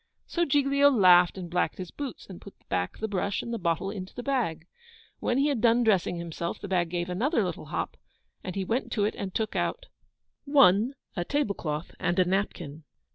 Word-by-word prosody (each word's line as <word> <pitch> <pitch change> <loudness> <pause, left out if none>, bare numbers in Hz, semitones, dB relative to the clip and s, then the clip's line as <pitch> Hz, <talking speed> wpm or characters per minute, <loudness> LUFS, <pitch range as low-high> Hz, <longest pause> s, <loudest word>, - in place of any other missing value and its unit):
So 345 -1 0
Giglio 280 0 +4
laughed 180 -8 +6
and 180 -2 -5
blacked 180 +1 -1
his 185 -2 -7
boots, 280 -5 -6
and 185 -3 -11
put 200 - -12
back 90 0 -1
the 220 - -3
brush 200 -1 -1
and 235 - -5
the 230 - -2
bottle 170 +2 -1
into 190 -3 -7
the 245 - -5
bag. 225 - -1 0.5
When 245 - 0
he 280 +2 +3
had 270 -6 -1
done 235 0 +4
dressing 195 -6 +2
himself, 170 0 -4
the - - -7
bag 180 -3 +1
gave 175 0 -2
another 225 - +1
little - - -4
hop, - - -4 0.5
and 185 - -5
he 195 -1 -2
went 235 +7 -1
to 205 -3 +1
it 215 - 0
and 195 -1 -4
took 220 +3 -2
out - - -1 0.6
1. 265 -3 +5 0.2
A 175 - -1
tablecloth 175 - -2
and 175 +1 0
a 185 - +4
napkin. 175 -5 -2
195 Hz, 200 wpm, -28 LUFS, 175-245 Hz, 0.6 s, laughed